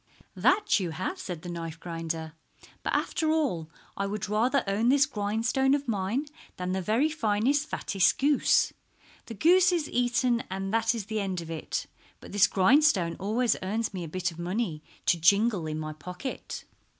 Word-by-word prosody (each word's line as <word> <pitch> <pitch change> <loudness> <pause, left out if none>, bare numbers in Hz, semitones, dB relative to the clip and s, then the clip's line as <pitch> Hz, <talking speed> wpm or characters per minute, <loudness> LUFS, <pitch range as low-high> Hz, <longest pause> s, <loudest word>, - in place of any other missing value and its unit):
"That 415 - +3
you 180 -3 -2
have," 265 - -4
said 175 - -6
the 175 - -6
knife 165 -2 -6
grinder. 165 -2 -5 0.5
"But - - -2
after 315 -2 0
all 265 - 0 0.3
I 200 - -2
would 210 +1 -3
rather 235 +6 +2
own 205 +4 +1
this 275 +1 +5
grindstone 235 +4 +1
of 285 -1 -4
mine 215 +6 -1 0.3
than 180 0 -3
the 190 0 -1
very 225 - +2
finest, 280 +1 +1
fattest 195 -2 +1
goose. 285 +1 +3 0.5
The 230 - -7
goose 360 - +5
is 335 -4 0
eaten 245 -1 +1
and 195 +1 -4
that 225 +1 +2
is 220 -4 -4
the 220 +1 -2
end 190 -3 -2
of 165 0 -8
it, 160 - -3 0.3
but - - -12
this 205 0 +5
grindstone 195 - +3
always 220 +4 +1
earns 210 +3 -2
me 185 -2 -4
a - - -5
bit 185 +3 -2
of 165 - -12
money 175 -2 -2 0.2
to 170 - +3
jingle 200 +1 +3
in 155 0 -3
my 155 0 -4
pocket." 180 - -7
205 Hz, 175 wpm, -28 LUFS, 180-250 Hz, 0.5 s, this